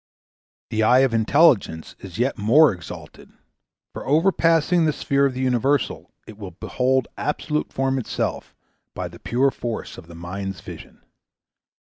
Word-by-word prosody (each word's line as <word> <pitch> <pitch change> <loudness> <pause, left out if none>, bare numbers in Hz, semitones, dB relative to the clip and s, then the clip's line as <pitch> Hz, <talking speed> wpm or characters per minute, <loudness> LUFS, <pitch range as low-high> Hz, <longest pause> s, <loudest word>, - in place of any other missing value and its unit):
The 110 - 0
eye 125 +4 +5
of 135 -3 +2
Intelligence 115 - +2
is 95 -3 -10
yet 125 +3 0
more 125 +6 +5
exalted; 85 -3 -11 0.6
for - - -7
overpassing 165 +1 +3
the 155 - +1
sphere 140 0 +1
of 130 - -5
the 130 - -3
universal, 130 +2 0
it 110 -1 -13
will 95 -5 -9
behold 130 0 0
absolute 150 0 -2
form 135 0 0
itself 120 - -4 0.4
by - - -4
the - - -13
pure 135 +3 +1
force 120 -3 -6
of 85 - -14
the 85 - -12
mind's 95 +2 -6
vision. - - -12
130 Hz, 145 wpm, -22 LUFS, 105-140 Hz, 0.6 s, eye